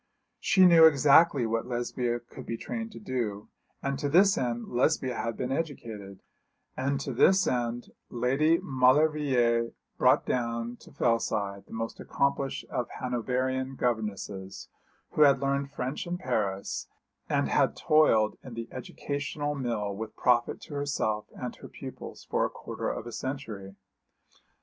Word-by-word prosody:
She 190 -2 +5
knew 170 -2 +8
exactly 145 -2 +6
what 115 +1 -1
Lesbia 120 0 -1
could 120 - -12
be 115 - -3
trained 225 - -5
to - - -9
do; 115 - -3 0.3
and 140 -1 -1
to 145 -1 -1
this 190 +6 +5
end 120 -2 -2
Lesbia 130 +1 +1
had 115 -1 -3
been 130 +1 -2
educated; 115 - -5 0.5
and 135 +1 -1
to 135 - -4
this 185 +9 +5
end 120 -1 -2 0.2
Lady 135 +7 +2
Maulevrier 130 -3 +3 0.3
brought - - +4
down 115 -1 -2
to - - -16
Fellside 100 -4 -1
the - - -12
most 115 0 -4
accomplished 140 0 -1
of 125 - -2
Hanoverian 130 +2 -1
governesses, 105 -5 -3 0.4
who - - 0
had 140 -2 +7
learned 140 0 0
French 130 +4 -4
in 175 +1 -2
Paris, 105 - -2 0.4
and - - +1
had - - +2
toiled 115 -9 +3
in 125 -3 -9
the 115 0 -5
educational 145 +3 -4
mill 115 -7 -2
with 110 +1 -6
profit 120 -1 +2
to - - -10
herself 140 -7 -1
and - - -5
her - - -10
pupils - - -9
for - - +1
a - - +1
quarter - - -5
of - - -4
a 120 - -7
century. 110 -7 -5
125 Hz, 145 wpm, -28 LUFS, 115-140 Hz, 0.5 s, knew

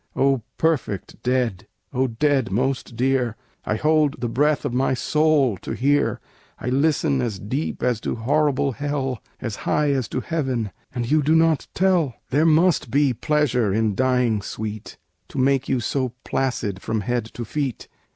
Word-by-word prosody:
"O 135 -2 +2 0.2
perfect 145 - -1
dead! 120 -5 0 0.3
O 130 0 +2
dead 130 0 +1
most 125 +2 -1
dear! 125 -2 +1 0.3
I 105 - 0
hold 150 +2 +2
the 120 - -1
breath 145 +5 +1
of 135 - -2
my 130 +1 +1
soul 145 -3 +2
to - - -6
hear. 145 +3 +1 0.4
"I 125 - -4
listen 140 0 +2
as 115 -5 -2
deep 130 +11 -3
as 120 -3 +1
to - - -2
horrible 140 +3 +1
hell, 135 -2 -3 0.2
As 115 -5 -4
high 150 -1 +1
as 130 -4 0
to 130 - -3
heaven, 130 - -2 0.2
and 120 -2 -3
you 155 0 +4
do 155 +3 +3
not 160 -2 +3
tell. 180 -9 +2 0.2
"There 150 +5 +3
must 160 -3 +3
be 140 +1 +3
pleasure 125 -4 +1
in 110 +1 +1
dying, 125 -2 +2
sweet, 110 +1 -6 0.3
To - - -10
make 135 0 +2
you 130 - +2
so 130 +1 -1
placid 115 -7 -2
from 110 -1 -2
head 120 +2 -1
to 120 - -4
feet! 140 0 -3
130 Hz, 165 wpm, -23 LUFS, 115-145 Hz, 0.4 s, you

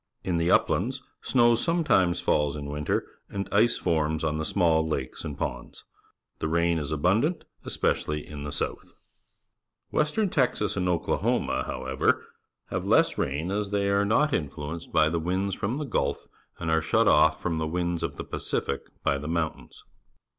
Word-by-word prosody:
In 90 -2 0
the 85 +1 +1
uplands - - +2 0.2
snow 120 -2 +4
sometimes 115 - +2
falls 75 -1 +1
in 75 -1 -5
winter, 75 0 -1 0.2
and 100 0 -4
ice 115 +4 +4
forms 80 -2 0
on 80 -1 0
the 80 - -2
small 80 -4 +2
lakes 70 -5 -3
and 75 -3 -5
ponds. 60 0 -5 0.6
The - - -1
rainfall 85 -1 +1
is 70 - -6
abundant, 100 - +1 0.2
especially 75 0 -1
in 75 -1 -7
the 75 - -5
south. - - -4 1.0
Western 175 +7 +1
Texas 125 -7 +1
ancj 90 -2 0 0.2
Oklahom - - +1
a, - - -1
how - - -5
ever,^aveieaaxain, 70 +3 0
as 105 -1 -1
they 100 -1 +1
are 100 0 +3
not 140 +8 +2
influenced 75 +2 -4
by 75 - +4
the 85 +1 0
winds 95 +4 -1
from 110 +7 -2
the 150 - -3
Gulf 130 - -1 0.3
and 80 -2 -2
are 80 0 +3
shut - - +2
off - - +5
from 85 -3 -2
the 80 - -1
winds 85 0 -1
of - - -3
the - - -5
Pacific - - -2 0.2
by 70 - +1
the 75 - -6
mountains. 80 -1 -3
85 Hz, 165 wpm, -27 LUFS, 75-100 Hz, 1.0 s, off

